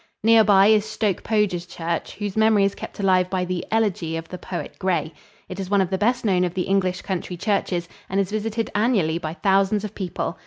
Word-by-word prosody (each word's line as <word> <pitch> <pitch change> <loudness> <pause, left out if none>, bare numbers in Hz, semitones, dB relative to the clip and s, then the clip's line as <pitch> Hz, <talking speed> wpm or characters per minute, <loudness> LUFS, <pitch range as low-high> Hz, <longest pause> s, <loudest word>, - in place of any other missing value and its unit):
Near 225 0 +6
by 200 -2 +5
is 215 0 +5
Stoke 215 -3 -1
Poges 200 -5 0
church, 170 -1 -4
whose 205 -1 -4
memory 220 -2 +4
is 200 0 +1
kept - - -9
alive 185 -2 +3
by 185 -1 -1
the 180 -1 -3
"Elegy" 195 -7 0
of 165 0 -7
the 180 - -7
poet 180 - -6
Gray. 170 -4 -1 0.3
It 185 - -7
is 190 -1 -4
one 200 0 +3
of 190 -1 0
the 190 - +1
best 240 +3 +1
known 185 -3 +3
of 180 0 -2
the 185 - 0
English 190 -1 0
country 180 -1 -4
churches 180 -3 -1 0.2
and 195 - 0
is 195 0 -1
visited 220 +1 -2
annually 205 -7 +1
by 160 -1 -5
thousands 195 +2 +2
of 210 - -5
people. 180 -2 -4
195 Hz, 220 wpm, -23 LUFS, 180-210 Hz, 0.3 s, Near